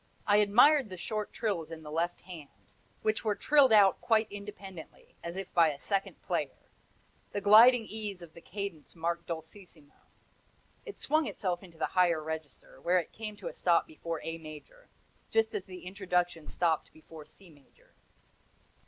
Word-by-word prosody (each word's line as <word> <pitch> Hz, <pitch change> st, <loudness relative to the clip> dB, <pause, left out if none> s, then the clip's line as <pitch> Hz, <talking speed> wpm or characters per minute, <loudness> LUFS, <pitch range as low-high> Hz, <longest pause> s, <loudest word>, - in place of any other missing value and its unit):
I 205 Hz, 0 st, +4 dB
admired 245 Hz, +6 st, +5 dB
the 185 Hz, -, -7 dB
short 215 Hz, +3 st, -4 dB
trills 185 Hz, -8 st, -2 dB
in 160 Hz, -1 st, -9 dB
the 150 Hz, -, -9 dB
left 170 Hz, +3 st, -1 dB
hand, 170 Hz, -6 st, -10 dB, 0.5 s
which 215 Hz, 0 st, 0 dB
were 210 Hz, -2 st, +1 dB
trilled 285 Hz, -1 st, +4 dB
out 200 Hz, -3 st, +6 dB
quite 220 Hz, -1 st, +3 dB
independently, 200 Hz, -4 st, -10 dB
as 170 Hz, +1 st, -5 dB
if 195 Hz, 0 st, -5 dB
by 165 Hz, -2 st, +5 dB
a 145 Hz, -2 st, -6 dB
second 195 Hz, +3 st, -2 dB
player; -, -, -2 dB, 0.8 s
the -, -, -1 dB
gliding 225 Hz, +4 st, +7 dB
ease 210 Hz, -4 st, -6 dB
of 165 Hz, -2 st, -13 dB
the 170 Hz, -, -13 dB
cadence 195 Hz, -7 st, -7 dB
marked 170 Hz, +1 st, -3 dB
dolcissimo. 165 Hz, -2 st, -9 dB, 0.9 s
It 425 Hz, -, -8 dB
swung 310 Hz, +1 st, +1 dB
itself 180 Hz, -4 st, -2 dB
into 175 Hz, -4 st, -15 dB
the 160 Hz, -, 0 dB
higher 175 Hz, -3 st, +3 dB
register, 155 Hz, -4 st, -8 dB
where 180 Hz, +5 st, +3 dB
it 170 Hz, -, -2 dB
came 215 Hz, -2 st, -7 dB
to -, -, -7 dB
a -, -, -5 dB
stop 170 Hz, -2 st, +2 dB
before 165 Hz, +1 st, -6 dB
A 165 Hz, 0 st, -5 dB
major, 155 Hz, -, -12 dB, 0.4 s
just 225 Hz, 0 st, +1 dB
as 190 Hz, -, -3 dB
the 185 Hz, -1 st, -10 dB
introduction 180 Hz, -3 st, -1 dB
stopped 165 Hz, -3 st, 0 dB
before 155 Hz, -1 st, -13 dB
C 190 Hz, -4 st, -16 dB
major. 145 Hz, -3 st, -24 dB
180 Hz, 170 wpm, -30 LUFS, 165-210 Hz, 0.9 s, gliding